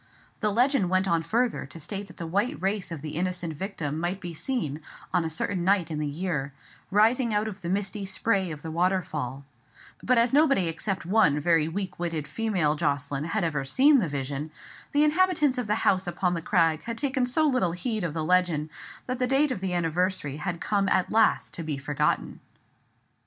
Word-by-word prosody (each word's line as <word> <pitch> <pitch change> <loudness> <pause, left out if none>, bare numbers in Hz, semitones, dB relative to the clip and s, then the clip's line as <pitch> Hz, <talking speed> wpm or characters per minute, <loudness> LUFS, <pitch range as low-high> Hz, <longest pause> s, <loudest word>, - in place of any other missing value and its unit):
The 210 - +1
legend 240 -2 +2
went 185 +1 +2
on 170 -3 +2
further 235 +7 0
to 165 - -11
state 200 +5 -6
that 180 - -14
the 170 - -5
white 205 - -1
wraith 195 -1 -2
of 160 -3 -6
the 155 - -4
innocent 180 0 -2
victim 155 -3 -4
might 175 +3 -2
be 175 -3 -6
seen, 160 - -3 0.3
on 180 -2 +3
a 160 - -2
certain 175 +3 -2
night 185 -3 +2
in 155 - -2
the 150 - -1
year, 145 -3 -3 0.4
rising 225 +3 +3
out 210 +1 +1
of 200 -2 -7
the 170 - -4
misty 200 +1 -2
spray 190 0 0
of 150 -2 -7
the 160 - -5
waterfall: 155 -7 -1 0.6
but 255 0 +2
as 235 +1 +3
nobody 275 - +4
except 190 +3 -3
one 180 -6 +3
very 165 0 +3
weak 185 +2 -4
witted 165 -4 -3
female 175 -4 0
Jocelyn 145 -2 -1
had 200 +4 -1
ever 150 -5 -1
seen 270 - +5
the 190 - 0
vision, 140 +1 -4 0.4
the 290 +1 +3
inhabitants 305 -4 +3
of 245 - -3
the 210 - +2
house 185 -1 +3
upon 175 +1 0
the 170 - -2
crag 165 -3 +2
had 230 -1 -5
taken 265 -2 0
so 310 +6 +2
little 255 - +2
heed 215 +3 -2
of 165 -3 -3
the 160 - -1
legend 170 -3 +1 0.3
that 255 0 -3
the 250 - +1
date 270 +2 +2
of 250 - -2
the 190 -1 -2
anniversary 170 -3 0
had 170 +2 -3
come 200 0 0
at 185 - +1
last 220 0 +3
to - - -6
be 155 -3 -3
forgotten. 145 +1 -1
185 Hz, 200 wpm, -27 LUFS, 160-215 Hz, 0.6 s, seen